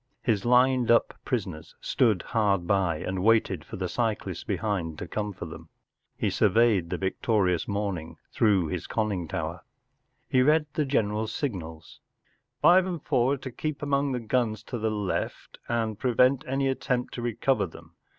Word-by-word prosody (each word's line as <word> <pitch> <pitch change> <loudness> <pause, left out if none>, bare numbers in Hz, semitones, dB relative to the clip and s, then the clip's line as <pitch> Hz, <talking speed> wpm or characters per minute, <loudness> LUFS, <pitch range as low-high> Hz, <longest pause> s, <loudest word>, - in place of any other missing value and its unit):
His 110 -4 +1
lined 125 0 +4
up 115 - +4
prisoners 95 -10 -4
stood 110 -8 +1
hard 100 -6 +1
by 90 -3 +1
and 95 +2 -3
waited 105 -6 +3
for - - -9
the 95 -1 -2
cyclists 110 +3 -2
behind 90 -8 -2
to 90 - -6
come 105 +3 -3
for 90 - -7
them. 80 - -10 0.5
He - - 0
surveyed 110 -7 +3
the - - -2
victorious 95 -2 0
morning 100 -5 -3
through 100 -6 +3
his 90 -1 -4
conning 100 -6 -1
towor. - - -4 0.7
He 130 - +3
read 150 +3 +4
the 150 - 0
general 110 -5 0
s 110 - -6
signals. 80 - -5 0.3
“ - - -45
Five 185 +1 +6
and 175 -5 -4
Four 130 -2 +2
are - - -1
to 130 0 -7
keep 155 +4 -4
among 140 -1 +1
the 125 - -1
guns 110 -2 -1
to 120 - -1
the 110 +1 0
left 105 -3 -3
and 110 -3 -1
prevent 130 +1 +3
any 135 +1 0
attempt 125 -2 -1
to 120 - -5
recover 120 -2 0
them. - - -14
110 Hz, 170 wpm, -27 LUFS, 95-125 Hz, 0.7 s, Five